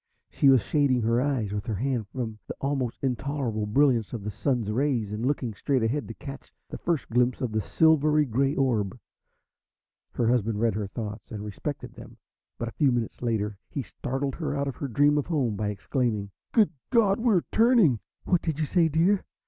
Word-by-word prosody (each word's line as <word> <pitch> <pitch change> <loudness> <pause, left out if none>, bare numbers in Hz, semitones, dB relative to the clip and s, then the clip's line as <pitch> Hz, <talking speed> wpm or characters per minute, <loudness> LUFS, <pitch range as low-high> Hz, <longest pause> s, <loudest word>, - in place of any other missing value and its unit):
She 140 - +4
was 130 -6 +5
shading 135 -5 +2
her 115 +2 +2
eyes 130 -7 0
with 105 0 -4
her 110 - -1
hand 120 0 -1
from 110 -2 -5
the - - -5
almost 135 -4 -2
intolerable 125 -4 -1
brilliance 120 -1 +2
of 115 -4 -4
the 105 - -3
Sun's 110 +1 -1
rays, 120 -4 0
and 110 +2 -3
looking 130 -4 -1
straight 130 +4 0
ahead 135 +6 -1
to 115 - -8
catch 135 0 -9 0.2
the - - -7
first 165 -6 -1
glimpse 125 +1 +2
of 125 -4 -2
the 110 0 0
silver 155 +2 +3
grey 135 +3 +1
orb. 115 -7 0 1.2
Her 120 - 0
husband 115 -3 +1
read 115 -1 +2
her 105 0 -3
thoughts 105 +1 -6
and 105 -2 -5
respected 135 +8 -5
them. - - -12 0.4
But 120 - -3
a - - -16
few 145 -4 +4
minutes 120 -2 -2
later 105 -4 -1
he 140 - -3
startled 135 +4 -3
her 155 -3 -3
out 140 0 -1
of 135 - -4
her 140 - -3
dream 145 +4 +3
of 145 - -3
home 135 -10 0
by 105 0 -1
exclaiming: 105 -1 -2 0.2
"Good 215 -3 +4 0.2
God, 225 -5 +3
we're 225 -7 +3
turning!" 220 - +4 0.2
"What 180 -3 +2
do - - -2
you 155 0 -1
say, 170 +2 +3
dear? 175 +6 +2
125 Hz, 195 wpm, -27 LUFS, 110-145 Hz, 1.2 s, was